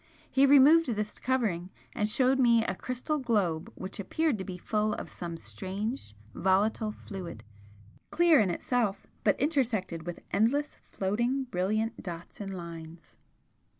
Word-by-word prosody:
He 275 +1 +5
removed 285 +4 +7
this 210 -3 -2
covering, 215 -9 0 0.2
and 210 0 0
showed 260 +4 +3
me 235 -3 +5
a - - 0
crystal 255 +9 -3
globe 200 - 0
which 190 +2 -7
appeared 285 - 0
to - - -3
be 185 -2 -6
full 210 +3 0
of - - -7
some 170 -2 -6
strange 195 - -5 0.2
volatile 205 +4 +1
fluid, 185 - -8 0.7
clear 340 -2 +5
in 205 -4 +3
itself, 215 +3 -1 0.2
but - - +3
intersected 215 - 0
with 175 - -5
endless 270 +8 +1
floating 235 +8 -1
brilliant 215 +1 -1
dots 175 +1 -8
and 195 -1 -5
lines. 165 -1 -9
210 Hz, 140 wpm, -29 LUFS, 185-255 Hz, 0.7 s, removed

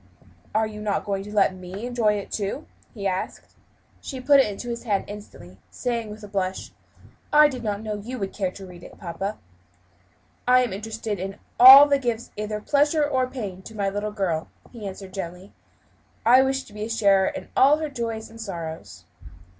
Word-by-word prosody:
"Are 220 0 +3
you 210 -1 -7
not 210 -2 -1
going 195 -1 -2
to 210 - -9
let 200 -2 +3
me 185 +4 -8
enjoy 235 -4 +1
it, 205 -1 -5
too?" 210 +9 -3 0.3
he 205 -5 -7
asked. 185 -1 -3 0.5
She 265 - -6
put 280 +2 +5
it 270 - +4
into 210 +4 -6
his 235 0 -4
hand 205 -4 0
instantly, 95 - -11
saying, 235 -3 -3
with 210 +1 -10
a - - -7
blush, 190 -2 -3 0.6
"I 300 0 +7
did 255 -4 -6
not 210 -1 -2
know 215 -1 -3
you 250 +5 -6
would 195 -4 -4
care 190 -3 -1
to 190 +1 -11
read 180 -1 -12
it, - - -13
papa." 195 +3 -5 1.1
"I 255 0 +6
am 240 - -3
interested 215 0 -4
in 195 +2 -5 0.2
all 270 +3 +12
that 280 -1 +2
gives 235 -1 -3
either 210 0 -3
pleasure 295 +5 +2
or 260 -3 +1
pain 210 -8 -6
to 220 +3 -11
my 200 -1 0
little 205 +2 -3
girl," 180 -6 -2 0.2
he 225 -5 -7
answered 190 0 -9
gently. 185 0 -7 0.7
"I 250 +3 +7
wish 265 0 0
to 210 - -17
be 210 - -8
a - - -7
sharer 200 -4 +3
in - - -5
all 280 +3 +6
her 310 0 -3
joys 230 -4 -4
and 225 0 -11
sorrows." 165 -6 -7
210 Hz, 195 wpm, -24 LUFS, 195-245 Hz, 1.1 s, all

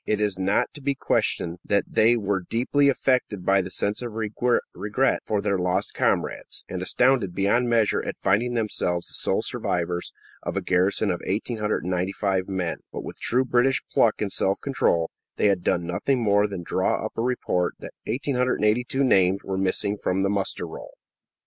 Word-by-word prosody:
It 105 - +1
is 105 -2 0
not 95 +2 +1
to 145 - -11
be 140 0 0
questioned 85 -8 -1
that 100 - +1
they 115 +2 +4
were 100 -3 -1
deeply 130 +8 +2
affected 125 -8 0
by 95 0 +4
a 95 0 -2
sense 100 +4 -1
of 120 -3 -5
regret 110 +1 0
for 105 -2 0
their 100 -2 0
lost 90 +2 -1
comrades, - - -1
and 90 - -5
astounded 120 -2 +2
beyond 115 +5 +2
measure 115 -3 +2
at - - -4
finding 120 +5 +1
themselves 90 -6 -1
the - - -14
sole - - 0
survivors 85 0 -2 0.3
of - - -4
a - - 0
garrison 95 +3 +2
of 90 - -3
1,895 95 -3 -1
men, 90 -3 -2
but - - -6
with - - -8
true 130 +2 +1
British 125 +2 +2
pluck 110 -2 +3
and 100 - -3
self 95 +1 0
control, 85 -12 0 0.2
they 105 - +3
had 95 -3 +1
done 85 - +1
nothing 105 +10 0
more 105 -1 +3
than 95 -4 -6
draw - - 0
up - - -6
a - - -1
report 115 -7 0
that - - -10
1,882 125 0 +1
names 95 -6 +3
were 95 - -3
missing 95 +2 -1
from 95 0 0
the 100 - +1
muster 100 -1 -1
roll. - - -10
100 Hz, 175 wpm, -25 LUFS, 95-120 Hz, 0.3 s, they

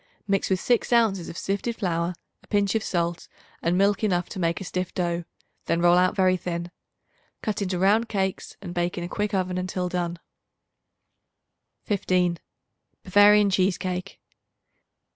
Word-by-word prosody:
Mix 195 -1 +1
with 190 -1 +1
6 240 +4 +1
ounces 220 -7 +2
of - - -8
sifted 200 +4 -2
flour, 175 -3 -1 0.3
a - - -23
pinch 200 -1 +1
of 220 -1 0
salt 170 -3 -2 0.3
and 170 +2 +1
milk 200 +2 +2
enough 180 -4 +1
to - - -6
make 170 -1 0
a - - -6
stiff 180 -1 -3
dough; 170 -1 -1 0.4
then 170 - +1
roll 175 0 +5
out 180 +1 +3
very 185 -1 +3
thin. 170 -1 -4 0.7
Cut 215 -1 -2
into 185 -2 -1
round 210 +5 +3
cakes 190 -3 -2
and 175 -2 -6
bake 175 0 -1
in 175 - -3
a - - -3
quick 205 +2 -2
oven 185 -1 -1
until 180 0 -2
done. 175 -1 -2 1.7
15. 180 -4 +1 0.6
Bavarian 205 +1 +5
Cheese 185 0 +2
Cake. 185 +1 -4
185 Hz, 160 wpm, -25 LUFS, 175-200 Hz, 1.7 s, roll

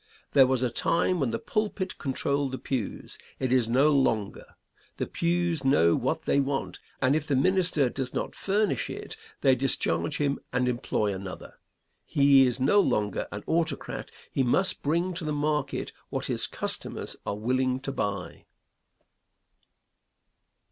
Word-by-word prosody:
There 135 -2 +6
was 130 -1 +1
a 125 - 0
time 170 +8 +1
when 135 -5 +1
the 115 - -1
pulpit 205 - -2
controlled 140 0 -1
the - - -2
pews. 125 -7 -4 0.2
It 130 -1 -1
is 130 -2 +4
so 115 - -4
no 140 +5 +4
longer. 115 -8 0 0.4
The - - -1
pews 170 -3 0
know 85 -11 +4
what - - -1
they - - +2
want, 140 0 -2 0.2
and 130 +3 +4
if 155 -1 -1
the 140 - +1
minister 170 -1 +3
does 125 0 -3
not - - -3
furnish 205 +2 0
it - - -7 0.3
they 135 -2 +5
discharge 100 -10 0
him 140 -1 0
and 125 0 +1
employ 115 -4 0
another. 95 -1 -8 0.4
He 140 -2 +5
is 125 - -1
no 145 +11 +4
longer 105 - 0
an 100 0 -6
autocrat; 160 -3 -2 0.2
he - - 0
must 185 +10 +2
bring 170 +5 0
to 175 0 -5
the 155 - -2
market 150 -1 -1 0.2
what - - -3
his - - -1
customers - - -3
are 100 - -3
willing 130 +3 0
to 135 - -3
buy. 100 -7 -4
135 Hz, 155 wpm, -27 LUFS, 125-155 Hz, 0.4 s, There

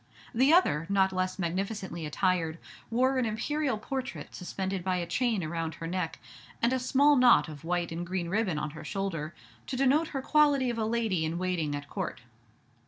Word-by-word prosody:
The 260 +5 +4
other, 165 - +4
not 190 -1 +3
less 185 0 -1
magnificently 190 -1 -3
attired, 165 0 0 0.3
wore 260 +3 +2
an 250 - +1
imperial 265 +4 -1
portrait 260 +4 -5
suspended 190 0 -4
by 185 0 0
a 175 -1 -1
chain 220 +2 0
around 160 0 -3
her 165 - -7
neck, 175 0 -2 0.4
and 235 +2 +2
a 260 - +1
small 275 +3 +4
knot 250 -7 +6
of 150 -1 -9
white 175 0 -1
and 165 +1 -3
green 175 0 -3
ribbon 190 -3 0
on 150 0 -3
her 155 0 -9
shoulder, 165 -3 -3 0.3
to 255 - -3
denote 275 +5 +3
her 270 -3 -4
quality 285 -5 +4
of 230 - -4
a 220 - +1
lady 220 -7 0
in 160 +2 -2
waiting 175 -5 -1
at 145 0 -6
Court. 130 - -4
190 Hz, 185 wpm, -29 LUFS, 170-250 Hz, 0.4 s, knot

